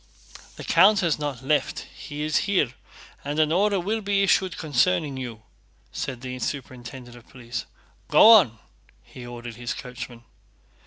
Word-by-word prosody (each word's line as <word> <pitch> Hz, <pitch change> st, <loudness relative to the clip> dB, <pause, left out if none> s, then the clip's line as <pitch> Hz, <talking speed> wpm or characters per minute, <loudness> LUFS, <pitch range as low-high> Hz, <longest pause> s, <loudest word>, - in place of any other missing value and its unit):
"The -, -, -9 dB
count 195 Hz, +4 st, +5 dB
has 165 Hz, -4 st, +1 dB
not 140 Hz, -4 st, -4 dB
left, 150 Hz, +3 st, 0 dB
he 150 Hz, 0 st, -6 dB
is 155 Hz, 0 st, +1 dB
here, 180 Hz, -11 st, +2 dB, 0.5 s
and 145 Hz, +1 st, -4 dB
an 155 Hz, -1 st, +3 dB
order 200 Hz, +3 st, +2 dB
will 215 Hz, +5 st, -2 dB
be 200 Hz, -1 st, +1 dB
issued 190 Hz, -3 st, +2 dB
concerning 155 Hz, +1 st, +1 dB
you," 120 Hz, -4 st, -7 dB, 0.5 s
said 135 Hz, -5 st, -5 dB
the 130 Hz, -1 st, -6 dB
superintendent 125 Hz, -1 st, -6 dB
of 120 Hz, -1 st, -16 dB
police. 120 Hz, -4 st, -7 dB, 0.4 s
"Go -, -, +7 dB
on!" 165 Hz, -, +6 dB, 0.5 s
he 125 Hz, -1 st, -11 dB
ordered 120 Hz, -1 st, -8 dB
his 120 Hz, 0 st, -4 dB
coachman. 120 Hz, -2 st, -8 dB
140 Hz, 150 wpm, -25 LUFS, 120-175 Hz, 0.5 s, Go